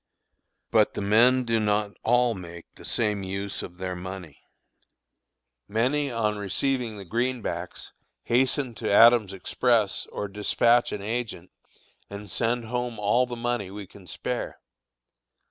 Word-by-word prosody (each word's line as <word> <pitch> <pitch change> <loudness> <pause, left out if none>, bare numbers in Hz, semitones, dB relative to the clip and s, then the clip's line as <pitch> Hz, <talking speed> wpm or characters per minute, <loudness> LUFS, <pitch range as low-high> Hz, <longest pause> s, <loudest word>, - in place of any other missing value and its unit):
But - - +3
the - - -3
men 120 +6 +5
do 115 -2 +1
not 105 -1 +1
all 120 0 +3
make 85 -3 -9
the - - -15
same 105 -3 0
use 100 +1 -4
of 90 - -9
their 90 0 -4
money. 90 -4 -8 1.3
Many 135 +6 +1
on 105 -3 -1
receiving 115 +3 -1
the 100 - -9
"greenbacks" 115 -5 -3 0.3
hasten 130 +1 +1
to - - -1
Adams' 115 -1 +6
Express 110 +2 +1
or 105 - -4
despatch 115 +4 +2
an 100 - -5
agent, 110 -5 -4 0.6
and 100 0 -8
send 120 +1 0
home 125 0 -3
all 105 +5 +2
the 120 - -5
money 120 -4 -2
we 100 +1 -8
can 95 0 -16
spare. - - -4
110 Hz, 135 wpm, -26 LUFS, 100-120 Hz, 1.3 s, Adams